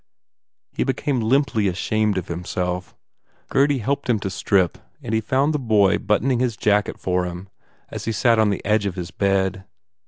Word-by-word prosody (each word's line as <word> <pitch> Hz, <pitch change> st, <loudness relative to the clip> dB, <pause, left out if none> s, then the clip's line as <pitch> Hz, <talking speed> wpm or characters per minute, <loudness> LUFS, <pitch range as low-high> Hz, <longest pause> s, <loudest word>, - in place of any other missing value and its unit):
He -, -, -1 dB
became 135 Hz, 0 st, -1 dB
limply 115 Hz, -2 st, +2 dB
ashamed 105 Hz, +2 st, 0 dB
of 90 Hz, -, -3 dB
himself. 90 Hz, +1 st, -4 dB, 0.5 s
Gurdy 140 Hz, +1 st, +3 dB
helped 140 Hz, +3 st, -2 dB
him 120 Hz, -, +3 dB
to 95 Hz, -, -3 dB
strip 95 Hz, -2 st, +1 dB, 0.2 s
and 110 Hz, -, -4 dB
he 110 Hz, -, +2 dB
found 135 Hz, +7 st, +1 dB
the 150 Hz, -, 0 dB
boy 105 Hz, -6 st, +3 dB
button 120 Hz, +5 st, +1 dB
ing 125 Hz, -, +1 dB
his 120 Hz, -4 st, 0 dB
jacket 105 Hz, -1 st, +1 dB
for 90 Hz, -1 st, 0 dB
him 90 Hz, +2 st, -7 dB, 0.4 s
as -, -, -6 dB
he 115 Hz, -, -1 dB
sat 115 Hz, +1 st, +3 dB
on 110 Hz, -1 st, +4 dB
the 100 Hz, -, -3 dB
edge 105 Hz, -1 st, +2 dB
of 95 Hz, -, -4 dB
his 90 Hz, -1 st, -6 dB
bed. 95 Hz, -1 st, 0 dB
105 Hz, 185 wpm, -22 LUFS, 95-120 Hz, 0.5 s, on